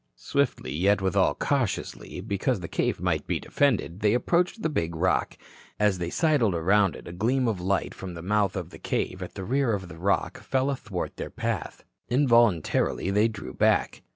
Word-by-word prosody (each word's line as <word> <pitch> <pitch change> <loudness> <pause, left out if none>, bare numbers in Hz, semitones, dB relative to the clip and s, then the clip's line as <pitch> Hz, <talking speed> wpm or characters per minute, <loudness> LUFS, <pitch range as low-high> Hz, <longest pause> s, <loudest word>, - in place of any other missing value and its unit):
Swiftly, 140 - -1
yet 100 +6 +3
withal 95 -2 +2
cautiously, - - -2
because 100 +3 -1
the 85 - -6
cave - - -1
might - - -1
be - - 0
defended, 115 -10 0
they 105 +2 +3
approached 175 - +1
the - - +3
big 85 - -2
rock. 90 +3 0 0.4
As 105 -3 +2
they 85 -1 -2
sidled 140 - +2
around 95 +3 +3
it, - - -11
a - - -6
gleam 120 +7 +1
of 105 -6 -1
light 95 +1 0
from 90 -2 -7
the 85 - -8
mouth 100 0 +1
of 90 -3 -5
the - - -11
cave 95 - -2
at 90 - -7
the 95 - -5
rear 130 0 +1
of 95 -3 -7
the 80 - -11
rock 100 +3 0
fell 135 +1 0
athwart 105 -9 -5
their - - -5
path. - - -4 0.3
Involuntarily 115 - +3
they 105 +3 +4
drew 105 -3 -7
back. - - +2
100 Hz, 185 wpm, -26 LUFS, 90-120 Hz, 0.4 s, they